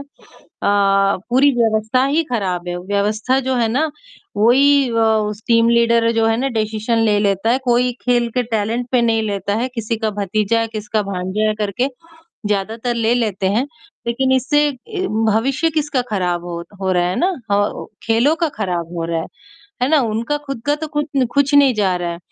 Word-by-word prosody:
अ, - - -6 1.3
पूरी 265 +4 +5
व्यवस्था 220 +2 +2
ही 300 +4 +1
ख़राब 185 -6 -2
है 175 - -3
व्यवस्था 205 +6 0
जो 260 0 -1
है 235 -2 +1
ना, 290 +7 0 0.5
वही 270 +5 +4
अ, - - -4
उस 215 -1 0
टीम 230 0 +4
लीडर 235 0 +3
जो 225 -1 +1
है 225 0 +2
ना 270 - 0
डिसीजन 220 +2 -1
ले 210 -2 +3
लेता 200 +1 +1
है 250 - +3
कोई 245 0 +2
खेल 240 -1 +1
के 250 - +2
टैलेंट 230 +1 -2
पे 250 - +4
नहीं 225 -1 +2
लेता 200 -1 -2
है 245 +3 -1
किसी 230 -1 -2
का 220 -1 -1
भतीजा 215 +3 0
है, 225 - -1
किसका 215 -1 -2
भांजा 195 +2 -2
है 215 - 0
करके। 210 +5 -1 0.6
ज़्यादातर 220 +4 -2
ले 230 0 +1
लेते 210 -5 -1
हैं 225 +7 +1 0.4
लेकिन 260 +3 0
इससे 295 +3 +2
अ, - - -5 0.6
भविष्य 265 +9 +1
किसका 295 -4 0
ख़राब 180 -4 -1
हो 170 -1 -5 0.2
हो 190 -1 0
रहा 175 -1 +2
है 180 - -2
ना 365 +3 +2 0.7
खेलों 235 +7 +2
का 330 -1 0
ख़राब 175 -2 -3
हो 165 - -2
रहा 165 -1 -1
है, - - -6 0.6
है 255 - +2
ना? 310 -1 +4
उनका 230 +4 -1
खुद 275 -4 -5
का 290 - +3
तो 315 +1 -5
खुद 295 0 -2 0.3
कुछ 280 0 +2
नहीं 280 -3 +5
जा 195 -4 +1
रहा 175 -1 -3
है, 170 - -6
225 Hz, 190 wpm, -18 LUFS, 205-255 Hz, 1.3 s, पूरी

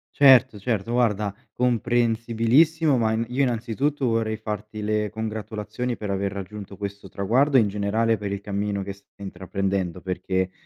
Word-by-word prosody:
Certo, 130 -5 +6
certo, 115 +1 -2
guarda, 105 -4 +1 0.2
comprensibilissimo. 120 +5 +2
Ma 110 -1 +2
in 115 +1 0
io 130 +3 0
innanzitutto 130 +3 0
vorrei 115 -2 0
farti 105 0 -5
le 105 0 0
congratulazioni 110 +2 -4
per 105 -2 -4
aver 100 0 -1
raggiunto 100 0 -7
questo 100 0 -6
traguardo, 130 +8 +2
e - - +7
in 105 - +2
generale, 105 +3 +1
per 100 -1 -4
il 100 - -2
cammino 100 0 -2
che 100 0 -5
stai 100 - -23
intraprendendo, 95 -2 -3
perché, 95 0 -1
110 Hz, 150 wpm, -24 LUFS, 100-120 Hz, 0.2 s, e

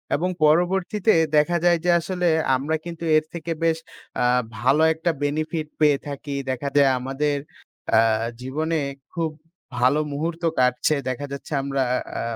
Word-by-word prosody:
এবং 175 +5 -1 0.2
পরবর্তীতে 180 +6 +2 0.2
দেখা 170 +4 +3
যায় 175 -1 +5
যে - - +2
আসলে 180 +1 -2 0.3
আমরা 145 +5 -1
কিন্তু 170 -1 -7
এর 155 - 0
থেকে 170 0 -5
বেশ 165 -1 +2 0.4
আ - - +3 0.3
ভালো 135 +7 +3
একটা 165 +2 -1
বেনিফিট 155 +2 -2
পেয়ে 150 -2 +4
থাকি। 140 0 -5 0.2
দেখা 130 +2 -3
যায় 140 -1 +6
আমাদের 135 +3 -1 0.6
আ - - +7 0.4
জীবনে 155 +5 -1 0.3
খুব 165 -3 -1 0.5
ভালো 130 +5 +3
মুহূর্ত 165 +4 -3 0.2
কাটছে। 125 +4 +2
দেখা 130 +3 -3
যাচ্ছে 140 +2 -8
আমরা 135 -1 -1 0.4
আ - - -2
155 Hz, 145 wpm, -23 LUFS, 140-170 Hz, 0.6 s, আ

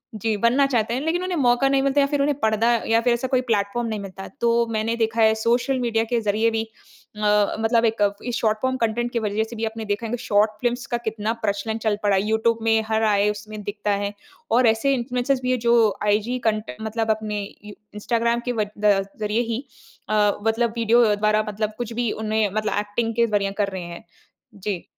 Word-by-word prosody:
जी, 215 +1 -1
बनना 245 +6 +3
चाहते 230 -3 0
हैं 260 - -1
लेकिन 340 +4 -1
उन्हें 365 -2 -2
मौका 245 0 +3
नहीं 275 0 +3
मिलता 275 +1 +3
या 280 - +3
फिर 285 -1 0
उन्हें 285 -1 +1
पर्दा 220 +2 +2 0.2
या 225 0 +4
फिर 240 0 +2
ऐसा 240 +2 -2
कोई 255 -1 +1
प्लेटफॉर्म 230 0 -1
नहीं 215 -1 -3
मिलता। 195 -1 -8
तो 235 - +3 0.2
मैंने 220 +1 -1
देखा 225 0 0
है 220 0 +5
सोशल 240 +4 +1
मीडिया 225 -2 +1
के 240 - +2
ज़रिए 215 +2 +1
भी 225 0 -1 0.5
अ, 210 -1 +2
मतलब 230 +1 +2
एक 205 -2 +1
इस 245 -1 -2
शॉर्ट 215 -2 +1
फॉर्म 260 0 +1
कंटेंट 240 +1 -1
के 235 - +1
वजह 215 0 -1
से 235 - -10
भी 225 - -1
आपने 220 0 -5
देखा 205 +2 -2
है - - -6
कि 245 - -1
शॉर्ट 210 +1 +3
फ़िल्म्स 245 +2 -1
का - - +3
कितना 220 0 -1
प्रचलन 205 +2 -1
चल 210 -1 +2
पड़ा 205 -1 +3
है। 190 - +2
यूट्यूब 225 +1 +1
में 225 0 +3
हर 220 0 +1
आए 210 -1 +3
उसमें 210 +1 -8
दिखता 205 0 -3
है 200 0 -3 0.4
और 240 +1 +4
ऐसे 225 +5 +2
इन्फ्लुएंसर्स 250 +1 -1
भी 255 0 0
हैं 250 - +1
जो 235 +1 +3 0.3
आईजी 215 +5 +1
कंट 215 0 -1
मतलब 220 0 -1
अपने 215 -1 -2
इ 210 +1 -11 0.2
इंस्टाग्राम 235 +2 0
के 245 - 0
व 215 -3 0
द 205 -2 +3 0.2
ज़रिए 210 +3 +1
ही 240 +5 -3 0.5
अ, 210 -1 +3 0.2
मतलब 225 0 +1
वीडियो 230 -1 +4
द्वारा 215 +1 +2
मतलब 215 +1 -3
कुछ 240 -1 -4
भी 235 - 0
उन्हें 215 -1 0
मतलब 215 0 0
एक्टिंग 225 +2 -2
के 235 -1 +3
ज़रिए 200 -2 0
कर 200 - +1
रहे 185 - -4
हैं। 170 0 -9 0.5
जी। 195 -2 -4
225 Hz, 220 wpm, -23 LUFS, 210-240 Hz, 0.5 s, है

